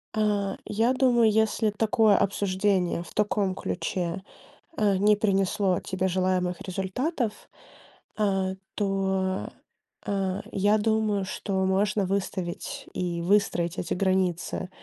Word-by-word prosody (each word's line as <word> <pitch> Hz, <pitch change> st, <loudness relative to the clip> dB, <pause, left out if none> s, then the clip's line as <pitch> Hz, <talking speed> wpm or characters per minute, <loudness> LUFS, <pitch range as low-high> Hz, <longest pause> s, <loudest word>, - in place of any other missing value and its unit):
Э, 205 Hz, -2 st, +1 dB
я 225 Hz, +4 st, +1 dB
думаю, 240 Hz, -4 st, +4 dB
если 220 Hz, 0 st, +2 dB
такое 215 Hz, 0 st, +3 dB
обсуждение, 190 Hz, -3 st, +1 dB
в -, -, -14 dB
таком 205 Hz, -2 st, +1 dB
ключе, 185 Hz, -1 st, -3 dB, 0.5 s
э, 205 Hz, -2 st, +2 dB
не 210 Hz, +2 st, +4 dB
принесло 195 Hz, -2 st, +1 dB
тебе 190 Hz, 0 st, -2 dB
желаемых 185 Hz, -1 st, 0 dB
результатов, 210 Hz, -, -3 dB, 0.7 s
э, 190 Hz, -2 st, +1 dB, 0.2 s
то, 190 Hz, -1 st, -1 dB, 0.6 s
э, 195 Hz, -1 st, -1 dB
я 205 Hz, +2 st, +3 dB
думаю, 215 Hz, -2 st, +1 dB
что 190 Hz, 0 st, -2 dB
можно 195 Hz, +2 st, +1 dB
выставить 185 Hz, -2 st, -3 dB
и 175 Hz, -2 st, -2 dB
выстроить 175 Hz, -2 st, +1 dB
эти -, -, -2 dB
границы, 185 Hz, -1 st, 0 dB
195 Hz, 110 wpm, -26 LUFS, 185-210 Hz, 0.7 s, думаю